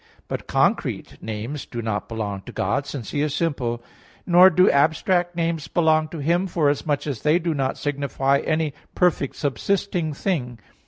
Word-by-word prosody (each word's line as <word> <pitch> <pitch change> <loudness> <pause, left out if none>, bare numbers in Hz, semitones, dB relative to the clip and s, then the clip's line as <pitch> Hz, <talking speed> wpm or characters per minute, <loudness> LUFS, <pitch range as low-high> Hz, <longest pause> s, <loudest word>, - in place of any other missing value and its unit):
But - - -5
concrete - - 0
names 110 +7 -5
do 120 - -6
not 110 -3 -3
belong 105 -4 -4
to - - -6
God, 135 +9 -1
since 125 -7 -6
He 145 - -1
is 150 -1 0
simple, 125 -8 -1 0.4
nor 180 +1 +7
do 185 +1 +4
abstract 175 +5 +2
names 165 -2 -1
belong 155 -1 +2
to 165 - -8
Him, 170 +6 +1
forasmuch 145 -3 0
as 140 -7 -4
they 155 +2 +3
do 170 -1 -1
not 135 -2 -1
signify 140 -1 0
any 155 -2 -1 0.2
perfect 175 -6 +1
subsisting 170 - -1
thing. 140 - -2
150 Hz, 160 wpm, -23 LUFS, 130-170 Hz, 0.4 s, nor